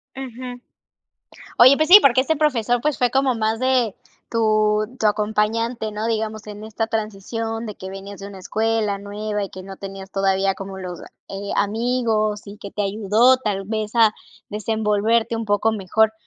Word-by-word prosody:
Ujú. 250 -1 -7 1.0
Oye, 260 +3 +8
pues 310 0 +1
sí, 405 +3 +11
porque 260 -1 +5
ese 320 +4 0
profesor, 245 -5 +1
pues, 300 +1 0
fue 245 -1 +1
como 265 -2 +2
más 220 +1 0
de 255 -5 +1 0.3
tu 215 -1 +2
tu - - -1
acompañante, 220 +2 0
¿no? 215 +2 -3
Digamos, 220 -1 -3
en 210 0 -8
esta 220 +1 -3
transición 225 +1 -3
de 210 -2 -6
que 190 - -8
venías 195 +1 -9
de 200 - -7
una 200 -1 -10
escuela, 220 +1 0
nueva, 210 +1 -4
y 195 - -5
que 185 - -9
no 195 0 -9
tenías 195 0 -8
todavía 195 0 +1
como 195 0 -7
los, 180 -2 -7 0.3
eh, 200 +1 -5
amigos 220 -1 0
y 205 +1 -10
que 200 - -9
te 210 - -3
ayudó, 215 +5 +3
tal 205 -5 -3
vez 215 0 -3
a 225 -2 +5 0.4
desenvolverte 220 +2 0
un 225 -1 -3
poco 205 +2 +2
mejor. 220 +2 +1
215 Hz, 175 wpm, -21 LUFS, 205-230 Hz, 1.0 s, sí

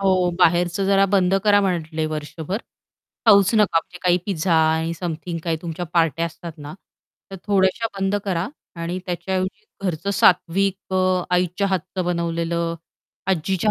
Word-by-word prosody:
हो, 185 -2 +2
बाहेरचं 175 +2 +3
जरा 195 0 +4
बंद 190 -1 +2
करा 205 -1 +5
म्हटले 165 -4 -1
वर्षभर, 155 +4 -4 0.7
खाऊच 200 -1 +6
नका 210 -6 +4
म्हणजे 180 +1 -8
काही 180 -1 +3
पिझ्झा 180 -3 0
आणि 160 +1 +2
समथिंग 170 0 -4
काही 165 -2 0
तुमच्या 170 +1 -4
पार्ट्या 165 -1 +2
असतात 170 +1 -9
ना, 145 +2 -8 0.6
तर 195 - -6
थोड्याशा 195 +2 +2
बंद 195 +1 0
करा 185 -1 -1 0.3
आणि 170 +2 -3
त्याच्याऐवजी 185 - -3 0.2
घरचं 175 +2 -2
सात्विक 190 0 +2
अ, 185 -1 +2
आईच्या 180 +2 +1
हातचं 185 -1 -2
बनवलेलं, 170 -1 -1 0.5
आजीच्या 190 +3 +1
180 Hz, 140 wpm, -22 LUFS, 165-195 Hz, 0.7 s, खाऊच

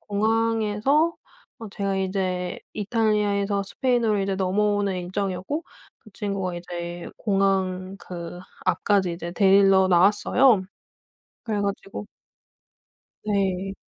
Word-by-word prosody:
공항에서 225 +8 +1 0.4
어 225 - -8
제가 195 -1 -2
이제 185 -2 -2 0.2
이탈리아에서 205 -2 +1
스페인으로 230 0 +1
이제 195 0 -1
넘어오는 200 +1 +1
일정이었고 190 - -3 0.4
그 215 - -17
친구가 195 -4 -3
이제 175 0 -6
공항 195 -2 0
그 175 -1 -8 0.3
앞까지 195 -4 +2
이제 170 0 -6
데리러 195 0 +5
나왔어요. 205 +5 +4 0.8
그래 215 -3 -1
가지고 200 0 -4 1.2
네. 195 -2 -1
195 Hz, 250 characters per minute, -24 LUFS, 185-210 Hz, 1.2 s, 데리러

